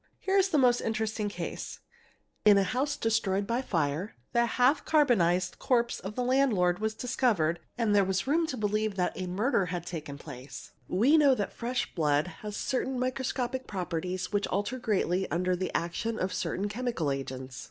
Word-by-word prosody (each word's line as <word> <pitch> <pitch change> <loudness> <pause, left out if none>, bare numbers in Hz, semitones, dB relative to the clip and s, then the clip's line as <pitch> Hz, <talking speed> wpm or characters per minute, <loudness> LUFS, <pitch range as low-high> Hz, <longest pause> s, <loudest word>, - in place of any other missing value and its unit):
Here 385 0 -1
is 390 +1 +2
a 310 - +3
most 245 -3 +4
interesting 220 -1 -1
case: - - -6 0.6
in 210 -1 +7
a 200 - +4
house 270 +8 -1
destroyed 200 -3 +1
by 235 +4 0
fire 165 - -1 0.2
the: 235 0 +3
half 255 +5 +3
carbo 295 -5 +4
'nised 180 -2 +1
corpse 235 -2 +1
of 195 +3 -7
the 250 - -1
landlord 235 -9 +2
was 220 0 -1
discovered 215 -10 +1 0.2
and 225 -3 +2
there 200 -1 +5
was 190 0 0
room 320 +4 +2
to 260 - -4
believe 215 -1 0
that 180 -2 0
a 185 - -4
murder 200 +1 +1
had 175 0 -4
taken 155 -5 -6
place; 140 -2 -10 0.2
we 245 - +4
know 285 -4 +5
that 205 -4 -3
fresh 245 +2 -3
blood 150 -3 +2 0.2
has 210 -1 -5
certain 265 0 -1
microscopic 255 0 -2
properties 180 0 -3
which 205 -1 +1
alter 205 +7 -2
greatly 190 -5 0
under 180 +1 +1
the 185 +1 -2
action 195 +7 -3
of 185 0 -1
certain 200 +2 -2
'chemical 215 - -2
agents. 130 -2 -5
210 Hz, 180 wpm, -29 LUFS, 180-250 Hz, 0.6 s, in